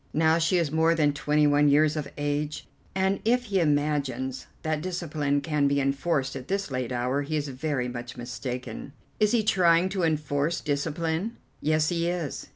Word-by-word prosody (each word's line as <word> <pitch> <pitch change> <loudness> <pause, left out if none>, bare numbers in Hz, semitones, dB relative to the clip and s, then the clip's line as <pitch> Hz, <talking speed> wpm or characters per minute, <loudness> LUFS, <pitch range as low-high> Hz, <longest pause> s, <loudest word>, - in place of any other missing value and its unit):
Now 160 +1 +4
she 170 +2 +2
is 165 -5 0
more 160 +1 +3
than 150 -3 +2
twenty 150 0 +2
one 145 0 +4
years 150 +2 +4
of 150 -2 -4
age, 145 +1 -2 0.3
and 190 +1 +1
if 245 +3 +2
he 200 -5 0
imagines 145 -4 0 0.2
that 155 -1 -1
discipline 155 -5 -1
can 150 -3 +1
be 140 0 +2
enforced 140 0 0
at 130 -1 -7
this 195 -5 -2
late 130 -2 -2
hour 125 +3 0
he 150 +2 -3
is 145 -1 -1
very 135 -1 -2
much 120 0 -7
mistaken." 125 +1 -6 0.3
"Is 210 -1 +3
he 235 -3 +3
trying 180 -3 +4
to 190 -1 -2
enforce 155 0 0
discipline?" 160 +7 -2 0.2
"Yes, 155 0 +2
he 170 -1 0
is. 175 -5 -4
150 Hz, 175 wpm, -27 LUFS, 140-170 Hz, 0.3 s, Now